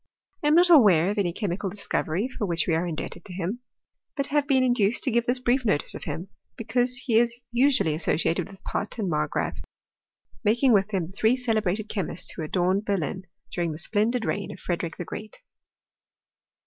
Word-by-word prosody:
I - - +2
am 300 - +5
not 350 +1 +6
aware 200 - +6
of 210 - -2
any 180 -3 +1
chemical 195 +1 -3
discovery 195 0 -1
fir 225 -5 -4
which 170 -1 0
we 170 - +1
are 165 +2 0
indebted 170 +1 -5
to 185 - -8
him; 190 +6 -3 0.6
but 275 - +5
have 290 0 0
been 265 -3 +3
in 250 -1 +3
duced 215 -1 +2
to 265 - 0
give 235 +1 +1
this 245 +1 +4
brief 250 +1 +1
notice 200 -10 0
of - - -8
him, 180 +4 -5 0.3
because 245 +2 0
he 240 -3 +2
is 240 0 0 0.2
Qiually 255 - +3
associated 160 +1 0
with 195 - -15
Pott 210 - -3
and 200 -6 -1
Margpraaf, 75 - -1 0.8
making 240 +5 +3
irith 200 -2 +3
them 190 -5 -1
the 170 - -11
three 220 +5 +3
celebrated 215 -4 0
chemists 185 -5 -3
who - - -7
adorned 180 +5 0
Berlin, 190 -2 -2 0.2
during 170 -3 -1
the - - -7
splendid 220 +6 0
reign 200 -1 -2
of - - -10
Frederick 170 -2 -3
the 175 - -5
Oreat. 215 +5 -8
205 Hz, 195 wpm, -26 LUFS, 175-245 Hz, 0.8 s, not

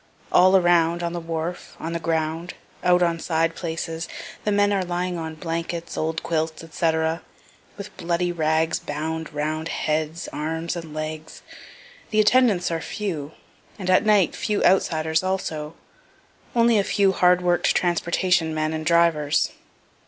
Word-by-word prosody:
All 185 +1 +6
around 175 -1 +3
on 170 0 -2
the 175 - -3
wharf, 165 +1 -5
on 165 +1 -4
the 170 - -2
ground, 165 +1 -2 0.3
out 180 0 +4
on 170 -1 +1
side 165 0 0
places 165 0 -4 0.4
the 210 - +2
men 205 0 +3
are 195 -2 +1
lying 180 0 -2
on 160 -1 -5
blankets, 165 +1 -4
old 160 0 -2
quilts, 160 -1 -2
&c., 165 -1 +2 0.9
with 200 0 -9
bloody 175 +1 0
rags 160 -1 +1
bound 160 +2 -4
round 155 +2 -2
heads, 155 +1 -2
arms, 160 +3 -3
and 165 -3 -7
legs. 155 0 -6 0.7
The 215 - +1
attendants 215 -5 +4
are 165 -1 -2
few, 160 -9 -4 0.4
and 185 -2 -1
at 185 - +5
night 210 -4 +3
few 210 -1 -1
outsiders 160 -4 +2
also 165 -5 -3 0.8
only 230 -2 +4
a - - +2
few 195 -1 +2
hard 180 -1 +4
work'd 175 -1 +2
transportation 175 -1 +1
men 155 0 -1
and 155 0 -3
drivers. 160 -3 +2
165 Hz, 145 wpm, -23 LUFS, 160-180 Hz, 0.9 s, All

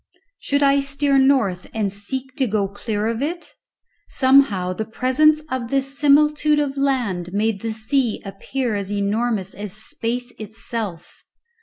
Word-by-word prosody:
Should 285 0 0
I 280 0 +4
steer 275 0 +1
north 245 -10 +2
and 205 -3 -1
seek 255 +6 -4
to 265 - +1
go 205 -2 0
clear 205 +1 -3
of 230 +2 -1
it? 340 +4 -4 0.6
Somehow, 260 -9 +3
the 220 - -3
presence 260 +7 +2
of 250 -3 -3
this 275 +1 0
similitude 300 +1 +4
of 285 -2 0
land 240 -11 -1
made 210 -1 0
the 225 - -2
sea 225 +2 0
appear 235 +5 -3
as 200 -1 -3
enormous 205 0 -1
as 205 -2 -6
space 235 +3 -3
itself. 215 -4 -6
235 Hz, 145 wpm, -21 LUFS, 205-275 Hz, 0.6 s, I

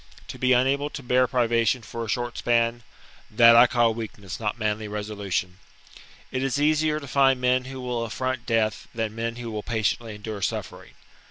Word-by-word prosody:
To - - -8
be 130 0 +2
unable 135 +3 +2
to 140 - -8
bear 125 +1 +3
privation 120 -1 +1
for 115 +1 -6
a - - -6
short 120 +1 -2
span, 120 0 +1 0.3
— - - -24
that 115 +2 +7
I 120 +1 +8
call 120 -2 +2
weak 110 -1 -6
ness, 100 -3 -8
not 105 0 -2
manly 110 -1 -2
resolution. 100 -3 -3 0.7
It 130 - -2
is 135 +1 -1
easier 155 +1 +2
to 140 - -10
find 135 -1 +3
men 125 0 +2
who 135 0 -7
will 125 -2 -3
affront 130 +2 -3
death 110 -2 0
than 110 -2 -2
men 115 +1 -3
who 120 -1 -6
will 105 -1 -4
patiently 110 0 -2
endure 105 -1 -7
suffering. - - -4
115 Hz, 190 wpm, -25 LUFS, 110-130 Hz, 0.7 s, I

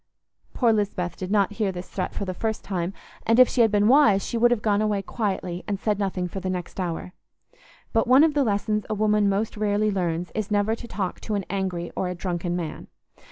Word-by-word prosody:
Poor 235 -3 +3
Lisbeth 185 -5 -1
did 185 - -6
not 200 -2 +2
hear 205 -2 -1
this 180 0 -7
threat 185 - -4
for 200 - -3
the 185 - -3
first 220 +4 -3
time, 180 -2 -2 0.3
and 230 +2 +3
if 255 - +9
she 245 - +1
had 225 - +5
been 205 0 +3
wise 230 -7 +5
she - - -4
would 235 +1 +5
have 240 -3 0
gone 205 -1 +2
away 210 -2 0
quietly 190 -6 -3
and 200 -2 -2
said 210 0 0
nothing 185 -2 -1
for 195 - -6
the 185 0 -3
next 180 0 -5
hour. 180 0 -3 0.8
But 225 - +2
one 260 +4 +7
of 320 -2 +3
the 290 -1 +2
lessons 210 -1 0
a 215 - 0
woman 210 -1 +2
most 205 +3 -1
rarely 210 0 +1
learns 175 -2 -2
is 215 -1 -3
never 205 +1 +2
to 235 +1 -6
talk 195 -5 -3
to 215 - -3
an 200 -2 -2
angry 185 -3 -2
or 185 - -1
a 180 - -3
drunken 175 -1 -2
man. 170 -3 -5
205 Hz, 230 wpm, -25 LUFS, 185-215 Hz, 0.8 s, if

